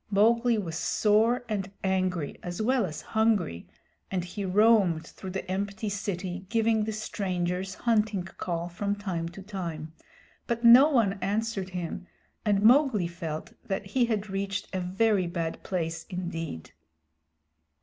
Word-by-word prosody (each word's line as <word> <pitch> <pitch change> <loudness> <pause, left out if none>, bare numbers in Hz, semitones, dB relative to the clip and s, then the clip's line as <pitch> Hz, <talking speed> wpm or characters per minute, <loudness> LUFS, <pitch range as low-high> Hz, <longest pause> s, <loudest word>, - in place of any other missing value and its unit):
Mowgli 230 +3 +4
was 165 -6 -3
sore 225 +6 +2
and 200 -3 -2
angry 185 -5 0
as 175 -1 -5
well 235 -1 +2
as 155 -2 -7
hungry, 215 - +1 0.4
and 185 -2 -1
he 200 +3 -5
roamed 195 -4 +4
through 190 - -9
the 190 +1 -4
empty 200 +2 -2
city 190 -2 -4
giving 225 -1 +2
the 220 - -2
Strangers' 185 -3 -2
Hunting 215 -5 +1
Call 175 -1 -4
from 200 +4 -2
time 180 -5 -3
to 190 +3 -10
time, 170 -6 -5 0.5
but 235 0 -2
no 245 +5 +9
one 220 -8 +2
answered 205 -1 -1
him, 180 0 -5 0.4
and 205 -2 +2
Mowgli 245 - +5
felt 165 -3 -6
that 195 +1 -2
he 240 +5 +2
had 215 -3 -1
reached 195 +1 -3
a 190 - 0
very 190 +1 +1
bad 165 -1 -3
place 165 -3 -3
indeed. 165 - -5
195 Hz, 140 wpm, -28 LUFS, 180-215 Hz, 0.5 s, no